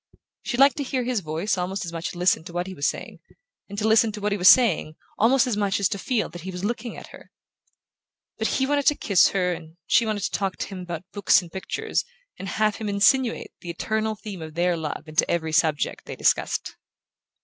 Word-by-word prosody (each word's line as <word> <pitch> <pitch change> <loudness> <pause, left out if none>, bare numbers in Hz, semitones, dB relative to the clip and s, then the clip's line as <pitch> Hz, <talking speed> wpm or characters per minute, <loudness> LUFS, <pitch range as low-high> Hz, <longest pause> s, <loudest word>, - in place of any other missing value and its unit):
She 240 - -3
liked 275 0 +5
to 285 - -1
hear 260 -1 -2
his 245 -2 0
voice 170 +4 -2
almost 185 +2 -3
as 170 - -7
much 165 0 -3
as - - -5
to - - -10
listen 180 -2 +2
to 175 - -10
what 175 +1 -2
he 190 - -7
was 145 -4 -1
saying, - - -7 0.5
and 200 - -8
to 215 +1 0
listen 220 0 +4
to 210 - -6
what 205 0 -1
he 200 - 0
was 180 +2 +8
saying 205 -10 +4 0.2
almost 240 +3 +4
as 245 -4 -1
much 200 -2 0
as 200 - +3
to 200 - -3
feel 230 +1 0
that 175 +1 -10
he 185 - -7
was 180 +1 -5
looking 235 +1 -4
at - - -10
her; - - -14 1.1
but - - +1
he 265 - +1
wanted 285 0 0
to 295 - +5
kiss 200 -9 +4
her, 180 -2 0
and 165 0 -10
she 230 - +3
wanted 210 -2 -2
to - - -1
talk 195 -2 -2
to - - -4
him 195 -2 -7
about 175 -1 -6
books 200 -2 +3
and 170 - -12
pictures, 190 +1 -2 0.4
and 195 - -5
have 215 +1 0
him 215 -2 -4
insinuate 230 +5 +2
the 175 - -9
eternal 220 +5 -2
theme 200 -4 -8
of 155 -1 -8
their 175 +1 +1
love 160 -1 -5
into 155 +2 +1
every 160 -2 -1
subject 155 -1 0
they - - -6
discussed. - - 0
195 Hz, 240 wpm, -24 LUFS, 175-220 Hz, 1.1 s, was